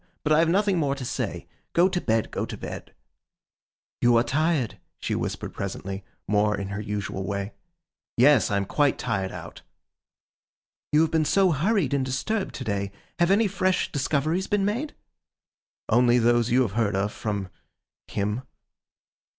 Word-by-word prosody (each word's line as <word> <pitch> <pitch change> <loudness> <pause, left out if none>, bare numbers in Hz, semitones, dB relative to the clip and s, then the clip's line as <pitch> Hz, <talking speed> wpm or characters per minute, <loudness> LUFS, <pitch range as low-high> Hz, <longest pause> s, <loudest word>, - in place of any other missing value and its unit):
But 155 - +3
I 155 - +5
have 165 0 +3
nothing 195 0 +2
more 140 -3 +1
to 135 -2 -6
say. - - -3 0.3
Go 175 +2 +5
to 180 -2 -1
bed, 110 -1 0
go - - -2
to - - -6
bed.' - - -7 1.1
'You 120 -1 +5
are 115 - +4
tired,' 155 -4 0 0.2
she - - -3
whispered - - -3
presently, 95 0 -5 0.2
more 105 0 +2
in 100 -1 -4
her 100 +1 -4
usual 100 -2 -3
way. 100 +1 -3 0.6
'Yes, 130 +1 +5
I 100 - +1
am 100 - 0
quite 145 +7 +2
tired 95 -5 -2
out.' - - -9 1.3
'You 150 - +5
have 160 - +2
been 160 -1 +3
so 190 +4 +3
hurried 165 - +1
and 140 -2 +2
disturbed 135 +12 -2
to 130 - -5
day. 100 -3 -2 0.3
Have 175 0 +4
any 205 +4 +4
fresh 185 -1 0
discoveries 155 +5 0
been 205 -1 +1
made?' 245 +9 -2 0.9
'Only 120 +1 +4
those 120 0 +3
you 130 +2 +4
have 110 - -2
heard 105 -1 0
of, 100 +2 0
from—him. 105 +1 -5
130 Hz, 160 wpm, -26 LUFS, 105-170 Hz, 1.3 s, I